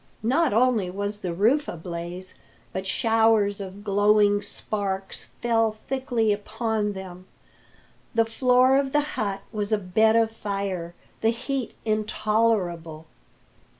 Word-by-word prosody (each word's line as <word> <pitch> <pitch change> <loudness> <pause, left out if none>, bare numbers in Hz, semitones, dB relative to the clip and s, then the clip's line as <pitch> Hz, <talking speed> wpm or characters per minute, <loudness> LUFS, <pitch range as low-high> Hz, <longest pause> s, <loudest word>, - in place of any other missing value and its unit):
Not 280 +7 +2
only 225 -4 +2
was 205 +2 -3
the 185 -4 -3
roof 230 - +2
ablaze, 175 +2 -6 0.4
but 190 +1 -4
showers 220 -2 +2
of 195 +1 -8
glowing 205 0 +3
sparks 200 -1 -4 0.2
fell 225 -2 +3
thickly 235 -2 -1
upon 215 0 -2
them. 185 -1 -9 0.9
The 230 0 +4
floor 255 +3 +4
of 270 -1 -2
the 295 - +4
hut 195 -2 -2
was 210 -1 -3
a 215 - +4
bed 215 +3 +3
of 225 -1 +3
fire, 195 -5 -4 0.3
the 225 - +3
heat 255 +1 -3
intolerable. 210 -7 0
210 Hz, 120 wpm, -25 LUFS, 195-225 Hz, 0.9 s, The